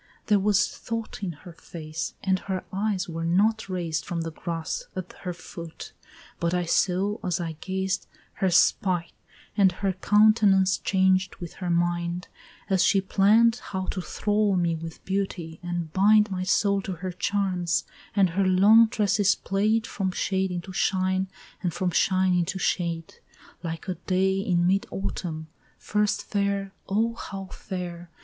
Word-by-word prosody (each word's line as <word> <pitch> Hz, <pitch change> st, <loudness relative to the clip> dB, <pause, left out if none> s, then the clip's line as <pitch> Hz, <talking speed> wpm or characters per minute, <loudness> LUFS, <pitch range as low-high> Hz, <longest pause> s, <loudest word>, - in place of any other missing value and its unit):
There 210 Hz, -2 st, +4 dB
was 205 Hz, +1 st, +3 dB
thought 230 Hz, -2 st, -6 dB
in 190 Hz, -3 st, -2 dB
her 170 Hz, +3 st, -13 dB
face, 160 Hz, -1 st, -6 dB
and 190 Hz, -1 st, +2 dB
her 190 Hz, -1 st, -4 dB
eyes 200 Hz, -1 st, -1 dB
were 165 Hz, -1 st, -4 dB
not 200 Hz, +5 st, +2 dB
raised 170 Hz, -4 st, -2 dB
From 170 Hz, +1 st, -3 dB
the 165 Hz, 0 st, -4 dB
grass 165 Hz, -, -4 dB
at 185 Hz, -1 st, -6 dB
her 180 Hz, -, -3 dB
foot, 170 Hz, -1 st, -9 dB, 0.5 s
but 170 Hz, +1 st, 0 dB
I 180 Hz, -1 st, 0 dB
saw, 195 Hz, +5 st, +1 dB
as 180 Hz, -2 st, 0 dB
I 170 Hz, -2 st, -3 dB
gazed, 190 Hz, 0 st, -2 dB, 0.3 s
Her 190 Hz, -, 0 dB
spite 175 Hz, 0 st, +2 dB, 0.4 s
and 195 Hz, -3 st, +5 dB
her 195 Hz, +1 st, -1 dB
countenance 205 Hz, -1 st, +4 dB
changed 190 Hz, -1 st, +2 dB
with 175 Hz, -2 st, -8 dB
her 180 Hz, -, -2 dB
mind 175 Hz, +1 st, 0 dB, 0.4 s
As 190 Hz, -3 st, +3 dB
she 195 Hz, -, +4 dB
plann'd 215 Hz, +5 st, +4 dB
how 190 Hz, -5 st, -5 dB
to 185 Hz, -, -3 dB
thrall 210 Hz, +2 st, +1 dB
me 170 Hz, -2 st, +1 dB
with 165 Hz, 0 st, -8 dB
beauty, 190 Hz, -4 st, -3 dB
and 175 Hz, -3 st, -4 dB
bind 210 Hz, +2 st, +5 dB
My 185 Hz, -1 st, -2 dB
soul 200 Hz, +1 st, +2 dB
to 190 Hz, -, -4 dB
her 180 Hz, +2 st, -5 dB
charms, 180 Hz, -2 st, 0 dB, 0.3 s
and 195 Hz, -4 st, +4 dB
her 195 Hz, +4 st, +1 dB
long 205 Hz, +5 st, +7 dB
tresses 205 Hz, -2 st, +2 dB
play'd 215 Hz, +3 st, +1 dB
From 195 Hz, -4 st, -2 dB
shade 190 Hz, +1 st, 0 dB
into 180 Hz, +1 st, -5 dB
shine 190 Hz, 0 st, +1 dB, 0.3 s
and 180 Hz, -3 st, 0 dB
from 180 Hz, 0 st, 0 dB
shine 185 Hz, +1 st, +3 dB
into 175 Hz, +1 st, 0 dB
shade, 170 Hz, -3 st, -2 dB, 0.4 s
Like 165 Hz, 0 st, -5 dB
a 185 Hz, -, 0 dB
day 190 Hz, +1 st, 0 dB
in 175 Hz, -3 st, +1 dB
mid 195 Hz, +2 st, +2 dB
autumn, 155 Hz, -, -4 dB, 0.3 s
first 210 Hz, 0 st, 0 dB
fair, 200 Hz, -1 st, -1 dB, 0.2 s
O 225 Hz, +4 st, +1 dB
how 195 Hz, -4 st, -7 dB
fair! 175 Hz, -2 st, -6 dB
190 Hz, 155 wpm, -26 LUFS, 175-200 Hz, 0.5 s, long